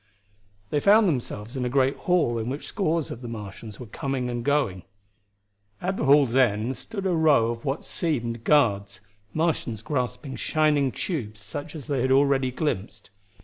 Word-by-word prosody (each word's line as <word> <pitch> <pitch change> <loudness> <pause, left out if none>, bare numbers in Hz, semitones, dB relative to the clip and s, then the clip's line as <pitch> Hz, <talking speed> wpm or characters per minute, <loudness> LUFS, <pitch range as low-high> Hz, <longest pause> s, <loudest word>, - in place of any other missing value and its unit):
They 145 - +2
found 210 +5 +5
themselves 120 - -3
in 130 - -2
a 125 - 0
great 135 +1 +2
hall 165 -10 +1
in 115 +2 -3
which 140 +3 -4
scores 165 -5 -1
of 120 - -7
the 120 - -6
Martians 105 -1 -8
were 125 - -7
coming 130 +1 -3
and 120 -1 -3
going. 140 -10 +1 1.0
At 190 +2 -2
the - - -1
hall's 135 -3 +5
end 120 -1 +2
stood 200 -3 -6
a 190 - +2
row 145 -8 +4
of 115 +2 -7
what 140 +2 -2
seemed 120 -9 -2
guards, 100 -9 +2 0.3
Martians 155 -9 -1
grasping 130 +1 -3
shining 150 -1 +2
tubes 115 - -4
such 145 +10 -7
as 145 -5 -7
they 140 -4 -1
had 130 +1 +1
already 135 -1 +3
glimpsed. 125 -9 -3
130 Hz, 170 wpm, -25 LUFS, 115-150 Hz, 1.0 s, found